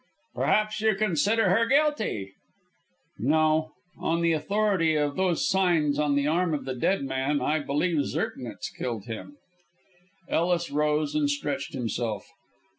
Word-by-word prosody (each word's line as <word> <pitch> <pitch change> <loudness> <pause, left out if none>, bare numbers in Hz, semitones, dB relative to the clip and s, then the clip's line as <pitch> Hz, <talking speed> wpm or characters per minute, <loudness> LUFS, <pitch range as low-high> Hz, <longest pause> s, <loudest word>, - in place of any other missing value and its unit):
"Perhaps 215 0 +1
you 220 -2 +3
consider 205 +1 +2
her 230 +4 +3
guilty?" 265 - +1 0.9
"No. 155 +4 +2 0.3
On 165 +1 0
the 170 0 +3
authority 190 -1 +1
of 145 -1 0
those 185 -3 +1
signs 165 -6 +2
on 145 -1 +2
the 140 0 +1
arm 165 +1 +1
of 145 - -5
the 130 - -3
dead 140 +7 0
man, 135 +2 -1
I 155 +1 +1
believe 150 +2 0
Zirknitz 115 -4 -4
killed 115 -5 -4
him." 115 - -8 0.9
Ellis 170 0 0
rose 150 0 +1
and 300 -1 +1
stretched 285 -1 -3
himself. 115 -4 -3
155 Hz, 135 wpm, -27 LUFS, 145-195 Hz, 0.9 s, you